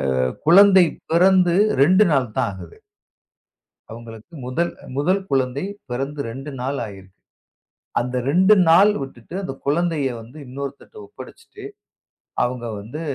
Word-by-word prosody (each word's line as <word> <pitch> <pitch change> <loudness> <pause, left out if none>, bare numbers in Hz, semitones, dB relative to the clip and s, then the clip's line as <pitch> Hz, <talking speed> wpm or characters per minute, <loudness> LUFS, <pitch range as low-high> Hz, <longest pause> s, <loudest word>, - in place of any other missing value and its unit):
அ - - 0 0.3
குழந்தை 190 0 +7 0.3
பிறந்து 180 0 +4 0.3
2 185 +7 +4
நாள் 125 -6 0
தான் 125 -4 +1
ஆகுது. 90 -3 -12 1.1
அவங்களுக்கு 115 +6 -12
முதல் 170 +7 -2 0.3
முதல் 185 +7 +1
குழந்தை 135 +4 -1 0.2
பிறந்து 135 +4 -4
2 135 +5 -8
நாள் 135 +2 -3
ஆயிருக்கு. 95 -2 -12 0.9
அந்த 125 +1 -3
2 190 +6 +5
நாள் 195 +6 +6
விட்டுட்டு, 135 +3 -10
அந்தக் 135 -6 -7
குழந்தையை 150 -3 0
வந்து 120 +7 -14
இன்னொருத்தர்ட்ட 140 - -8
ஒப்படைச்சிட்டு, 410 0 -13 0.8
அவங்க 125 -1 -3
வந்து 120 +10 -8
140 Hz, 120 wpm, -21 LUFS, 125-175 Hz, 1.1 s, குழந்தை